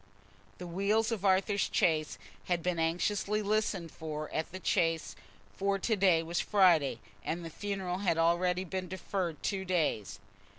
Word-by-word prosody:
The 180 - -7
wheels 200 +6 +1
of 215 -4 -2
Arthur's 195 +1 +2
chaise 155 -3 +1 0.3
had 175 -2 -1
been 180 -2 0
anxiously 200 +6 0
listened 205 -5 0
for 155 -1 -6
at 160 - -2
the 185 - -6
Chase, 165 -3 0 0.4
for 200 0 0
to 220 +3 0
day 185 -5 +4
was 170 +1 -2
Friday, 170 - +4 0.2
and 170 +1 -3
the 165 - -7
funeral 190 -1 -3
had 185 -5 +1
already 175 +2 +2
been 185 0 -4
deferred 180 -2 -3
two 195 -2 -1
days. 165 - -1
180 Hz, 155 wpm, -31 LUFS, 165-195 Hz, 0.4 s, day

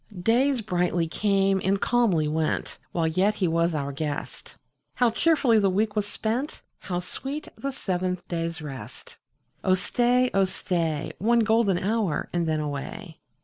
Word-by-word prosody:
Days 245 +3 +3
brightly 175 -3 0
came 195 +1 +2
and 195 +1 +2
calmly 200 -12 +2
went, 155 +1 -1
While 165 -2 0
yet 185 +6 +2
he 190 -4 +1
was 165 0 +1
our 140 -1 -2
guest; 145 +1 -5 0.4
How 245 -2 +3
cheerfully 275 -5 +3
the 200 -2 +3
week 210 +3 0
was 210 -1 0
spent! 230 +8 -3 0.2
How 175 -2 -3
sweet 275 - -6
the 275 - -4
seventh 185 -6 -2
day's 165 -1 -3
rest! 135 -4 -9 0.5
Oh 185 - +4
stay, 245 +5 +2
oh 195 -1 +4
stay. 165 -5 -2
One 235 +4 +3
golden 220 -4 +3
hour, 200 -3 -1
and 170 -1 0
then 155 -1 +1
away. 155 +5 -5
190 Hz, 150 wpm, -26 LUFS, 165-225 Hz, 0.5 s, Oh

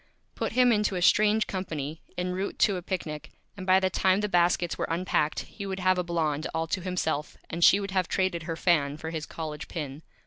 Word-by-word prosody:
Put - - -3
him 250 -1 +5
into 210 -3 +1
a 180 - -2
Strange 215 +3 +4
Company 160 -5 -4 0.2
en 180 0 -1
route 190 +2 -3
to 200 - +3
a 180 - -4
Picnic 155 -5 -4 0.3
and 185 -2 -8
by 185 0 +6
the 190 0 0
time 190 +2 +2
the 210 - 0
Baskets 175 -2 +2
were - - -2
unpacked 165 -2 0
he 200 -2 -8
would 190 0 -4
have 185 0 +2
a - - +1
Blonde 160 -3 -1
all 160 0 0
to 185 - -1
himself, 165 -5 -2
and 170 +1 -1
she 195 - +7
would 200 -1 -4
have 185 -2 +1
traded 185 -3 0
her 165 - -1
Fan 150 -5 +2
for 160 +1 -6
his 160 -2 -4
College 155 -2 -6
Pin. 150 -3 -6
180 Hz, 220 wpm, -27 LUFS, 160-190 Hz, 0.3 s, she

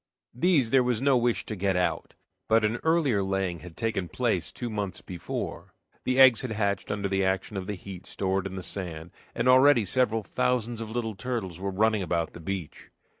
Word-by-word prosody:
These 135 -3 +2
there 135 - +6
was 125 -3 0
no 135 +1 +3
wish 120 -1 +1
to 110 - -4
get 95 -1 0
out. 90 -2 -1 0.3
But 110 0 +4
an 110 +3 0
earlier 155 -10 +2
laying 95 -3 -1
had 85 +1 -12
taken 110 -6 -1
place - - -1
two 120 - -5
months 105 -4 -3
before, 85 -3 -6 0.3
the 130 +1 +1
eggs 130 -4 +8
had 125 -4 -3
hatched 100 -2 -1
under 105 -1 -1
the 95 0 0
action 95 +2 -1
of 95 -1 -4
the 105 - -3
heat 95 -1 -10
stored 95 0 -1
in 95 - -7
the 95 - -5
sand, 85 -4 -5 0.2
and 120 +1 0
already 130 -2 +6
several 115 +1 +1
thousands 120 +1 -1
of 110 - -5
little 110 -1 -2
turtles 100 -6 -4
were 100 +1 -2
running 110 +2 +2
about 85 -3 -1
the - - -10
beach. 90 -1 -6
105 Hz, 200 wpm, -27 LUFS, 95-120 Hz, 0.3 s, eggs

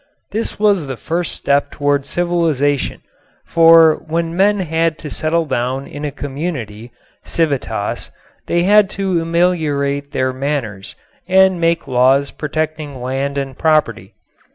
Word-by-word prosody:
This 225 - -3
was 200 -7 +2
the 135 -2 -5
first 170 +5 -3
step 140 0 +1
toward 145 -1 -1
civilization, 160 -6 0 0.4
for 165 -1 +6
when 165 +1 -2
men 200 +2 +3
had 165 -1 0
to 150 - -8
settle 165 +1 0
down 130 0 -2
in 145 +1 -8
a 150 - -1
community 135 -7 -5 0.3
(civitas) 135 -10 -2 0.4
they 170 0 +1
had 205 +1 +5
to 190 -4 0
ameliorate 155 -5 0
their 130 0 -1
manners 130 -8 -4 0.3
and 190 -1 +4
make 165 -1 +1
laws 135 +2 +3
protecting 155 -2 -4
land 135 +3 -3
and 135 -1 -3
property. 155 -1 +1
155 Hz, 130 wpm, -17 LUFS, 140-170 Hz, 0.4 s, for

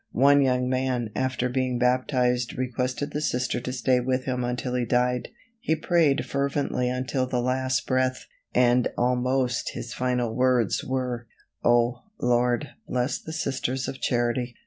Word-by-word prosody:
One 140 +3 +6
young 125 -1 +2
man 130 -3 -1
after 130 -1 0
being 125 0 -1
baptized 125 0 +1
requested 130 +3 -2
the 150 - -2
Sister 125 -3 0
to 125 - -4
stay 125 0 +2
with 130 +1 0
him 125 -1 -2
until 125 +1 -2
he 125 -1 +1
died. 125 +1 +1 0.3
He 160 -9 0
prayed 160 -3 +2
fervently 140 -2 -1
until 130 +1 -1
the 125 -1 -1
last 130 +1 0
breath, 130 0 0 0.3
and 125 0 +3
almost 125 0 0
his 115 - -6
final 125 -2 -1
words 125 -2 +2
were: 125 -2 -3 0.4
"Oh, 120 0 +3 0.2
Lord, 125 +3 +1 0.2
bless 125 +2 -1
the 160 - -8
Sisters 130 -4 -2
of 135 - -6
Charity." 120 0 0
125 Hz, 145 wpm, -26 LUFS, 125-130 Hz, 0.4 s, One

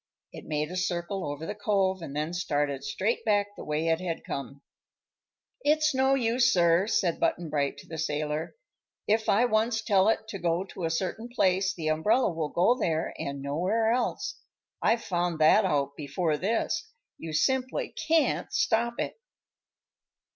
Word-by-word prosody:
It - - -10
made 150 +1 -2
a - - -5
circle 180 -1 -2
over 145 +2 -6
the - - -3
Cove 195 -3 0
and 145 -4 -7
then 155 +3 -2
started 145 -5 -1
straight 185 +11 -1
back 205 -1 +1
the - - -8
way 150 +2 -1
it 165 +1 +1
had 170 -3 -3
come. 140 0 -6 1.0
"It's 305 0 +3
no 265 +1 +3
use, 235 -1 +3
sir," 175 +2 +3
said 180 -6 +1
Button 165 -3 0
Bright 140 -2 0
to - - -13
the 160 -1 -7
sailor. 150 0 -2 0.5
"If 220 +1 +2
I 225 +5 +4
once 220 0 +1
tell 200 -2 +4
it 225 0 0
to 195 - -5
go 170 +1 0
to 185 -2 -6
a - - 0
certain 190 +8 -3
place, 190 -4 +1
the 160 -3 -2
umbrella 195 +10 +2
will 160 -2 -3
go 185 +11 +3
there, 160 0 -1
and 140 0 -4
nowhere 185 +11 +1
else. 250 +2 -1 0.4
I've 230 0 +2
found 175 -2 -1
that 160 +7 +5
out 140 -5 0
before 150 +2 -1
this. 225 - -1 0.3
You 165 - -6
simply 260 - 0
can't 320 0 +2
stop 235 +1 +1
it." - - -4
180 Hz, 170 wpm, -28 LUFS, 155-220 Hz, 1.0 s, that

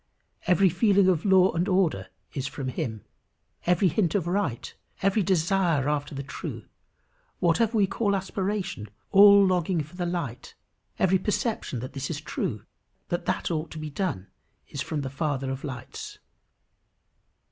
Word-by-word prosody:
Every 190 +2 +5
feeling 195 +2 +3
of 175 -1 +1
law 190 -1 +5
and 170 +3 -1
order 180 - +1 0.3
is 135 -1 -3
from 135 -3 -4
him. 120 -6 -4 0.6
Every 180 +2 +4
hint 175 +2 +1
of 190 -5 +1
right, 175 - -2 0.3
every 195 +2 +3
desire 175 -5 +2
after 145 -1 -1
the 140 - -4
true, 140 - -7 0.7
whatever 215 +6 +2
we 205 - +5
call 200 +1 0
aspiration, 190 - -3 0.2
all 200 0 +8
longing 180 -3 +1
for 160 +5 -14
the 175 -1 -1
light, 165 -9 -4 0.4
every 190 0 +3
perception 210 - -2
that 130 - -7
this 135 -1 -4
is - - -3
true, - - -4 0.4
that 175 0 -2
that - - -1
ought 160 0 -2
to - - -9
be 155 -1 -5
done, 145 - -2 0.4
is 140 - -5
from 150 -1 -3
the 135 - -4
Father 135 -2 -2
of 135 0 -5
lights. 130 -3 -7
175 Hz, 155 wpm, -26 LUFS, 140-195 Hz, 0.7 s, all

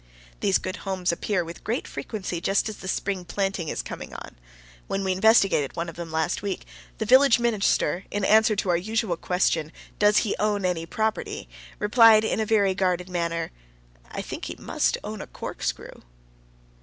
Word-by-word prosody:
These 195 -2 +3
good 185 +1 -5
homes 185 -2 -1
appear 180 +1 -1
with 170 +1 -9
great 230 +4 -2
frequency 185 -6 -5
just 195 +4 +1
as 215 - -6
the 190 - -9
spring 190 -1 -2
planting 195 -2 -2
is - - -3
coming - - -8
on. - - -9 0.5
When 195 - -2
we 190 - 0
investigated 195 - +3
one 170 0 -3
of 165 - -10
them 170 -1 -7
last 160 +2 -1
week, 200 -2 -4 0.3
the 220 - -2
village 260 +1 +6
minister, 205 -6 +1
in 205 -1 -1
answer 220 0 +5
to 195 -2 -1
our 175 - +4
usual 215 0 -1
question, 165 -3 0 0.3
"Does 210 0 +5
he 205 - -1
own 205 -2 +1
any 170 -2 -1
property?" 220 - -2 0.3
replied 220 0 +6
in 220 - 0
a 220 - 0
very 200 -3 +3
guarded 180 -1 0
manner, 170 -2 -2 0.6
"I - - -5
think - - -6
he - - -5
must - - 0
own - - -6
a - - -8
corkscrew." - - -5
195 Hz, 180 wpm, -25 LUFS, 175-215 Hz, 0.6 s, village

